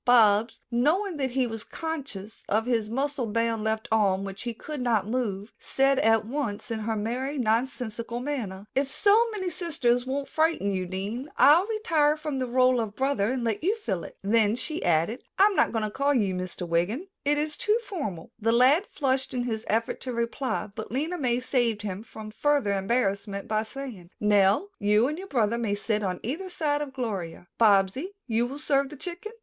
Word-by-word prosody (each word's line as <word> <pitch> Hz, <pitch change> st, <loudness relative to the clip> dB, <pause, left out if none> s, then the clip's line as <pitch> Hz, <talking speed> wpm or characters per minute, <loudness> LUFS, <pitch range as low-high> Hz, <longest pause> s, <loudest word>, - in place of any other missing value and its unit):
Bobs, 225 Hz, -2 st, +4 dB
knowing 320 Hz, +10 st, +1 dB
that 265 Hz, -2 st, 0 dB
he 255 Hz, +1 st, +1 dB
was 225 Hz, -2 st, -5 dB
conscious 280 Hz, -, -6 dB
of 220 Hz, +2 st, +2 dB
his 230 Hz, -4 st, 0 dB
muscle 270 Hz, +1 st, -1 dB
bound 230 Hz, 0 st, 0 dB
left 220 Hz, +1 st, -1 dB
arm, 195 Hz, -3 st, +3 dB
which 195 Hz, 0 st, -6 dB
he 240 Hz, -, -3 dB
could 285 Hz, +5 st, -7 dB
not 225 Hz, -5 st, +2 dB
move, 215 Hz, -4 st, -2 dB
said 270 Hz, 0 st, +2 dB
at 225 Hz, -1 st, +3 dB
once 235 Hz, -4 st, -3 dB
in 225 Hz, -, -1 dB
her 220 Hz, +1 st, -2 dB
merry, 250 Hz, +7 st, -2 dB
nonsensical 235 Hz, 0 st, -1 dB
manner: 230 Hz, -8 st, -4 dB
"If 275 Hz, +1 st, +1 dB
so 430 Hz, -, +4 dB
many 380 Hz, -5 st, -3 dB
sisters 265 Hz, -8 st, 0 dB
won't 275 Hz, +1 st, -2 dB
frighten 315 Hz, -10 st, +1 dB
you, 185 Hz, -1 st, -2 dB
Dean, 205 Hz, +9 st, -4 dB
I'll 330 Hz, +7 st, +6 dB
retire 325 Hz, -10 st, +2 dB
from 300 Hz, -3 st, -3 dB
the 255 Hz, -, -1 dB
role 255 Hz, 0 st, +3 dB
of 215 Hz, -2 st, -5 dB
brother 260 Hz, -5 st, +1 dB
and 260 Hz, -2 st, -2 dB
let 225 Hz, +3 st, -1 dB
you 400 Hz, +6 st, +2 dB
fill 195 Hz, -, -3 dB
it." -, -, -10 dB
Then 215 Hz, +1 st, +3 dB
she 305 Hz, +6 st, -4 dB
added, 175 Hz, +9 st, +1 dB
"I'm 400 Hz, +1 st, +5 dB
not -, -, +3 dB
going 225 Hz, -2 st, -1 dB
to 210 Hz, -, -4 dB
call 280 Hz, +4 st, +1 dB
you 200 Hz, -6 st, +2 dB
Mr 180 Hz, -1 st, -5 dB
Wiggin. 175 Hz, -, 0 dB, 0.2 s
It 290 Hz, +1 st, +2 dB
is 300 Hz, 0 st, -1 dB
too 425 Hz, +1 st, +2 dB
formal." 220 Hz, -, -5 dB
The 225 Hz, +1 st, +2 dB
lad 265 Hz, -, +5 dB
flushed 265 Hz, -2 st, -1 dB
in 245 Hz, -, 0 dB
his 225 Hz, -2 st, -3 dB
effort 225 Hz, +1 st, 0 dB
to 255 Hz, -, -4 dB
reply, 235 Hz, +1 st, -2 dB
but 220 Hz, 0 st, -7 dB
Lena 310 Hz, +8 st, -2 dB
May 245 Hz, -3 st, +1 dB
saved 240 Hz, -5 st, 0 dB
him 200 Hz, -1 st, -4 dB
from 220 Hz, -1 st, -9 dB
further 280 Hz, -2 st, +1 dB
embarrassment 200 Hz, -1 st, -1 dB
by 215 Hz, 0 st, +1 dB
saying, 220 Hz, -6 st, -8 dB
"Nell, 210 Hz, -, +3 dB
you 210 Hz, +3 st, +3 dB
and 305 Hz, +4 st, -3 dB
your 385 Hz, -, -7 dB
brother 235 Hz, -, +1 dB
may 215 Hz, -3 st, 0 dB
sit 215 Hz, +1 st, -1 dB
on 185 Hz, -3 st, -2 dB
either 325 Hz, -, -3 dB
side 295 Hz, -4 st, 0 dB
of 290 Hz, -2 st, -4 dB
Gloria. 195 Hz, -10 st, -4 dB
Bobsy, 205 Hz, -, +4 dB, 0.2 s
will 225 Hz, -, -2 dB
you 275 Hz, -, -6 dB
serve 280 Hz, -2 st, +1 dB
the 300 Hz, -, -9 dB
chicken? 355 Hz, +8 st, -6 dB
240 Hz, 195 wpm, -27 LUFS, 210-285 Hz, 0.2 s, I'll